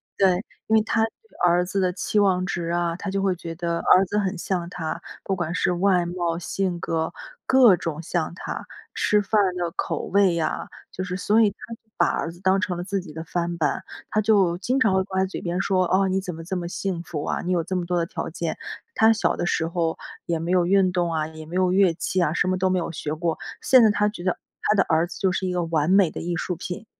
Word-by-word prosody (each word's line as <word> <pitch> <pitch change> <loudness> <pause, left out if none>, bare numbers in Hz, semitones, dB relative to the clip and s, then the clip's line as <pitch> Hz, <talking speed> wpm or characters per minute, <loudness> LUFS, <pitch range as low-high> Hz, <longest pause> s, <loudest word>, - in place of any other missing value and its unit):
对， 190 -2 +4 0.3
因 220 - +3
为 - - +4
他 225 0 +1
对 445 - -14
儿 175 +1 +3
子 190 +2 -2
的 185 -1 +2
期 180 +3 -1
望 185 -2 +3
值 170 -3 -3
啊， 170 0 0
他 195 +2 -5
就 195 - -1
会 190 -2 +2
觉 165 -1 -7
得 170 0 -2
儿 190 +1 +5
子 205 +3 -1
很 190 -3 -1
像 175 -1 -2
他， 165 -3 -4 0.2
不 195 - -1
管 175 -1 -3
是 - - +1
外 180 0 +2
貌、 175 -1 -2
性 180 0 -2
格， 160 0 -1 0.4
各 255 -7 +7
种 165 -2 -4
像 170 0 -1
他， - - -6 0.3
吃 210 - +2
饭 210 +1 +2
的 175 -2 -2
口 - - -2
味 195 -3 +3
呀， 160 -2 -2 0.2
就 185 - -4
是 180 0 -4
所 210 +4 +3
以 215 - +5
他 200 - -14 0.4
把 - - +4
儿 165 - -1
子 175 - -15
当 190 0 +3
成 185 -1 -2
了 175 - -4
自 195 +1 -2
己 175 -4 -11
的 160 +1 -6
翻 170 0 -2
板。 150 -4 0 0.3
他 215 - +2
就 200 -5 +3
经 255 +8 0
常 220 -6 +3
会 190 0 +2
挂 190 -1 -2
在 - - +2
嘴 190 - -6
边 175 +1 -2
说， 185 -2 +2
哦， 190 +1 +3
你 190 0 0
怎 180 -3 -5
么 165 - -8
这 190 +3 -4
么 175 -1 -3
幸 180 0 -3
福 155 -3 -5
啊， - - -1
你 180 - -3
有 175 -2 +1
这 185 +3 -4
么 180 - 0
多 180 -1 0
的 170 - +1
条 - - -5
件， 165 0 -4 0.3
他 220 0 +5
小 220 - +1
的 175 - -2
时 160 - 0
候 165 -1 -1 0.3
也 170 -1 0
没 165 +2 -3
有 180 -2 +3
运 190 -1 +4
动 175 -2 0
啊， 155 -1 0
也 155 0 -10
没 170 - -7
有 185 -1 +2
乐 185 -3 +4
器 180 +2 -1
啊， 150 - +2
什 180 - +1
么 185 0 0
都 190 - +2
没 185 - +1
有 170 -1 -2
学 155 -1 -4
过。 165 0 -2 0.2
现 255 -3 +6
在 220 - +6
他 210 0 +2
觉 210 -4 -5
得 185 - 0 0.2
他 210 - +2
的 195 - +4
儿 165 +1 +2
子 175 - -9
就 190 - +1
是 190 0 -2
一 - - -1
个 175 -1 0
完 165 -1 0
美 190 -3 +5
的 - - -6
艺 175 +1 -2
术 180 +2 -2
品。 180 +5 -6
180 Hz, 280 characters per minute, -24 LUFS, 170-195 Hz, 0.4 s, 各